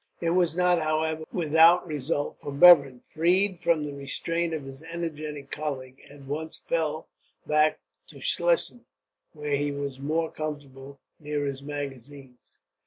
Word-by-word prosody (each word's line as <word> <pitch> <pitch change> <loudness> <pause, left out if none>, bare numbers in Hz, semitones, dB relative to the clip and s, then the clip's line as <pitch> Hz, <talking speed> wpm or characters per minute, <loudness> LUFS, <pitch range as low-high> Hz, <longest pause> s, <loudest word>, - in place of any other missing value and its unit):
It 165 -1 0
was 175 -1 +2
not, 180 -1 +3
however, 155 0 -1
without 165 +1 +5
result; 145 -1 -3
for 145 - -6
Bevern, 140 -5 +7
freed 180 +3 +1
from 165 -3 +1
the 145 -1 -5
restraint 165 +4 -2
of 155 -3 -4
his 135 +1 -10
energetic 155 -4 -6
colleague, 135 -3 -5
at 140 -1 -13
once 150 +4 -5
fell 160 -1 -1 0.4
back 155 0 +2 0.3
to - - -16
Schlesien, - - 0 0.5
where 150 -2 -2
he 145 +1 -1
was 140 -2 -5
more 160 +3 -1
comfortable, 140 -3 -7 0.2
near 150 -1 -3
his 135 -1 -4
magazines. 140 -2 -8
150 Hz, 140 wpm, -26 LUFS, 140-165 Hz, 0.5 s, Bevern